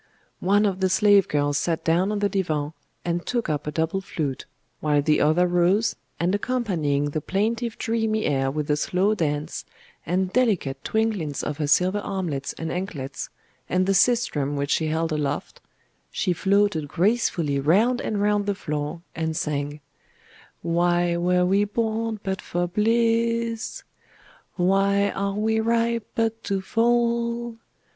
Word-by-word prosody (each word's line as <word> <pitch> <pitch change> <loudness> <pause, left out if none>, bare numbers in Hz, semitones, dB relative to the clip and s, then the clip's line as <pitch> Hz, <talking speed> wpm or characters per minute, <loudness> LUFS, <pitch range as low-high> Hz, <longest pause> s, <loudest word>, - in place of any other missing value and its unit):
One 205 +3 +3
of 195 -2 0
the 190 -1 +2
slave 205 0 +5
girls 145 -1 +1
sat 165 +1 -1
down 175 +5 +2
on 210 - -1
the 205 0 +1
divan, 155 -7 -1 0.3
and 175 0 -1
took 240 -7 -2
up 150 -1 -2
a - - -1
double 160 +5 -1
flute; 145 -7 -4 0.3
while 150 -1 +2
the 155 0 +3
other 160 +4 +4
rose, 180 +5 +2 0.2
and 175 +3 +1
accompanying 175 - 0
the 155 - -2
plaintive 225 - -1
dreamy 220 -1 0
air 135 -2 +1
with 150 +1 -3
a - - +4
slow 185 +7 +1
dance, 150 -6 -2 0.4
and 185 +3 -1
delicate 190 - +1
twinklings 210 -10 -1
of 150 0 -4
her 150 - 0
silver 185 +7 +3
armlets 175 -9 -3
and 160 0 -5
anklets, 155 -8 -5 0.4
and 185 +1 +2
the 195 - +2
sistrum 185 - +2
which 140 0 -2
she 160 - +1
held 160 +1 -1
aloft, 150 -2 -3 0.5
she 180 - 0
floated 195 -4 +1
gracefully 170 -6 +1
round 210 - +3
and 210 - -2
round 205 -1 +1
the 200 - +1
floor 150 -1 -4
and 160 -1 -2
sang 145 0 -3 0.8
Why 175 +1 +2
were 180 +1 +2
we 195 +3 +3
born 220 +1 -1
but 190 -1 -2
for 175 0 -2
bliss? 230 +3 0 0.7
Why 195 +2 +2
are 200 0 -2
we 220 +1 +1
ripe, 230 0 +1
but 225 0 -1
to 195 -1 0
fall? 235 +2 0
185 Hz, 150 wpm, -24 LUFS, 155-215 Hz, 0.8 s, slave